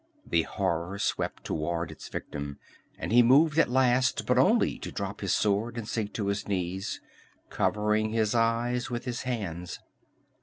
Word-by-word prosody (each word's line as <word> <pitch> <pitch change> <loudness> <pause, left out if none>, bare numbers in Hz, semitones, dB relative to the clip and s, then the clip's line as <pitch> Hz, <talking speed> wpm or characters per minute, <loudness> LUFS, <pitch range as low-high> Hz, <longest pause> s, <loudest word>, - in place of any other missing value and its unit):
The 85 - +2
horror 90 0 -2
swept - - -2
toward 85 +1 -2
its 80 - -10
victim 70 -1 -5 0.4
and - - -4
he 120 +2 +7
moved 150 +6 +5
at 165 - +4
last, 130 0 +2
but - - +3
only - - +3
to - - -6
drop - - -5
his - - -1
sword 110 +3 +1
and 115 -2 -4
sink 110 -3 -2
to 105 - -2
his 100 +1 -2
knees, 95 -1 -2 0.5
covering 105 +1 +1
his 110 -1 +1
eyes 120 +2 +1
with 120 0 -4
his 125 -2 -3
hands. 95 -9 -4
110 Hz, 160 wpm, -28 LUFS, 95-120 Hz, 0.5 s, he